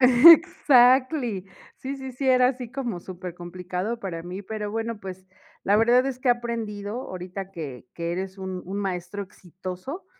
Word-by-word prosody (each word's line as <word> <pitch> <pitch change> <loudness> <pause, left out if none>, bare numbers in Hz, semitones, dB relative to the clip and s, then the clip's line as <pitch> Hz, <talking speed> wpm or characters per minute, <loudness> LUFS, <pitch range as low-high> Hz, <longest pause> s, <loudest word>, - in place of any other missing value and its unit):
Exactly. 255 - +6 0.3
Sí, 275 +1 -5
sí, 265 -1 -7
sí, 265 +2 -2
era 255 -1 +5
así 250 -2 -4
como 240 -8 -4
supercomplicado 180 +3 -5
para 180 -6 -5
mí, 180 +3 -7
pero 210 0 -4
bueno, 225 +1 -3
pues, 190 -1 -8 0.4
la 205 - +4
verdad 240 +4 +4
es 265 -2 -3
que 255 - -1
he - - +8
aprendido 230 -2 -3
ahorita 185 +1 -6
que 140 -9 -7
que 170 0 -3
eres 190 +2 -4
un 190 -1 -5
un 195 +3 -4
maestro 190 0 -3
exitoso, 185 - -8
205 Hz, 160 wpm, -25 LUFS, 185-250 Hz, 0.4 s, he